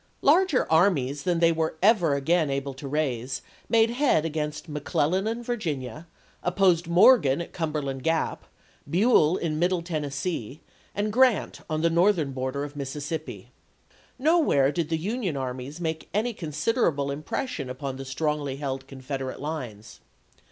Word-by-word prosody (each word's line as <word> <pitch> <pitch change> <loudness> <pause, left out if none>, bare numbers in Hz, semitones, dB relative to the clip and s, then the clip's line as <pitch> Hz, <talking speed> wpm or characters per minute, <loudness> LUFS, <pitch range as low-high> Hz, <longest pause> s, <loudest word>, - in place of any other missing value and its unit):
Larger 325 -1 +4
armies 150 -5 +3
than 175 0 0
they 165 0 +4
were 160 -1 -1
ever 185 -9 +4
again 160 +2 +1
able 140 0 -2
to 135 +2 -8
raise 135 -3 -2 0.3
made 225 0 +4
head 245 - +2
against 155 0 -3
McClellan 155 +5 0
in 230 +2 -3
Virginia, 160 - -4 0.3
opposed 180 -2 +2
Morgan 170 - +5
at 170 - -6
Cumberland 150 -5 -3
Grap, 165 0 0 0.5
Buell 180 - +4
in 155 -2 -2
Middle 175 0 +1
Tennessee, 150 - -3 0.4
and 210 +1 -1
Grant 250 -3 +3
on 155 0 -1
the 170 - +4
northern 170 -4 +3
border 130 +2 -3
of 145 0 -7
Mississippi. 145 +3 -5 0.7
No 315 +6 +3
where 140 - +3
did 165 -1 -2
the 165 - 0
Union 195 - -2
armies 130 +3 -5
make 160 -2 -3
any 230 +3 +1
con 165 -6 -6
siderable 150 - 0
impression 150 - -4
upon 130 +1 -5
the 135 - -6
strongly 145 0 -2
held 135 -1 -4
Con 135 -1 -11
federate 135 0 -4
lines. 125 -8 -6
155 Hz, 150 wpm, -26 LUFS, 140-180 Hz, 0.7 s, Morgan